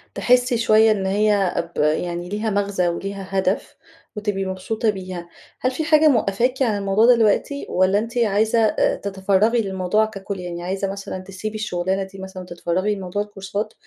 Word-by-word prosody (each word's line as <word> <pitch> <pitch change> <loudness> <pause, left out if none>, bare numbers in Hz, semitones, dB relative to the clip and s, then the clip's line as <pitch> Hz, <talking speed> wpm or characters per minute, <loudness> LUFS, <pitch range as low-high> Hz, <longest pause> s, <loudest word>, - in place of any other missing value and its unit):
تحسي 245 0 +3
شوية 220 -1 +5
إن 200 -3 0
هي 200 -1 +2 0.2
ب - - -3
يعني 175 +3 0
ليها 210 +3 -2
مغزى 200 -3 0
وليها 195 +3 -4
هدف 190 - -1 0.4
وتبقي 205 -2 -2
مبسوطة 190 +4 -2
بيها. 185 -3 -5 0.3
هل 255 - 0
في 290 +5 -3
حاجة 310 0 +5
موقفاكِ 245 0 +1
عن 225 -5 +2
الموضوع 200 +2 +2
دلوقتي 230 +5 +1
والّا 185 +2 +3
أنتِ 230 +2 -5
عايزة 220 0 +2
آآ، 220 -1 +2
تتفرغي 200 +4 +1
للموضوع 195 +1 +1
ككل؟ 200 -2 -6
يعني 175 -1 -6
عايزة 195 +2 -2
مثلًا 195 -1 -6
تسيبي 195 +3 -6
الشغلانة 190 -2 -1
دي 195 0 -11
مثلًا 190 -1 -8
وتتفرغي 180 +3 -1
لموضوع 195 +1 -3
الكورسات 205 +1 -5
200 Hz, 160 wpm, -22 LUFS, 190-220 Hz, 0.4 s, شوية